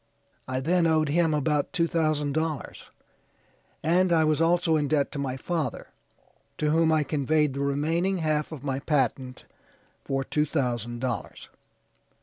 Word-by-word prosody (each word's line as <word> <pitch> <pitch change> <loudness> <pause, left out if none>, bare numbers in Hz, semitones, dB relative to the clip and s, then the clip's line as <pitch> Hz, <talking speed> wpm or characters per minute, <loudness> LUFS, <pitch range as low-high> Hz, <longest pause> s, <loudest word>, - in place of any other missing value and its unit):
I 130 0 -2
then 170 +4 +2
owed 155 -2 +2
him 165 +2 +2
about 150 +1 0
two 170 -4 +2
thousand 155 -3 0
dollars, 155 -3 -3 0.9
and 180 +3 +3
I 160 -2 +4
was 155 0 +1
also 170 0 +3
in 150 -2 +1
debt 145 -1 +1
to 145 - -5
my 135 -2 -3
father, 165 +3 -3 0.7
to 150 0 0
whom 160 0 +3
I 155 -1 +3
conveyed 150 0 +1
the 140 - -5
remaining 160 +7 0
half 155 -2 -1
of 145 -4 -8
my 135 -2 -2
patent 130 -3 -1 0.6
for 135 0 -1
two 150 +3 0
thousand 120 -5 -2
dollars. 125 -3 -4
150 Hz, 150 wpm, -26 LUFS, 140-165 Hz, 0.9 s, I